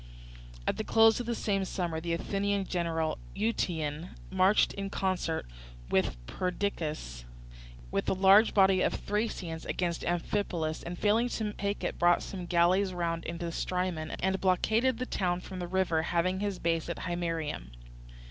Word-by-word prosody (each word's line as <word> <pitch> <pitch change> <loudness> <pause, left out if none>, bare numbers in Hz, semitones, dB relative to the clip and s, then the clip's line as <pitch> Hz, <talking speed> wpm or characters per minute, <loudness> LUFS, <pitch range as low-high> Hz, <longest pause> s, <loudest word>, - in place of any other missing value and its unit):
At - - 0
the 215 - -2
close 225 +1 +5
of 245 - -4
the 235 - 0
same 195 -3 0
summer 175 -4 -2
the 170 0 -2
Athenian 200 +3 -1
general 165 -3 -1 0.2
Euetion 175 -7 -1 0.2
marched 190 +2 +4
in 195 0 -4
concert 185 -4 -1 0.5
with - - +2
Perdiccas 155 - -3 0.7
with - - 0
a - - +3
large 195 +3 +6
body 190 -2 +5
of - - +1
Thracians 200 -6 -3
against 170 -2 -2
Amphipolis, 175 -2 -1
and 175 +1 -6
failing 220 +5 +2
to 215 -3 -2
take 200 0 -3
it - - -3
brought 175 0 +4
some 180 -3 -6
galleys 180 +2 +3
round 165 -1 -2
into 170 +1 -4
the 170 - -3
Strymon, 180 -3 -2
and 190 0 +1
blockaded 220 +7 +2
the 255 - -2
town 180 -6 0
from 185 0 -8
the 175 - -3
river, 180 -3 +1
having 175 +3 0
his 200 -2 -2
base 165 -1 0
at 170 - -3
Himeraeum. 165 - -3
180 Hz, 155 wpm, -30 LUFS, 170-200 Hz, 0.7 s, large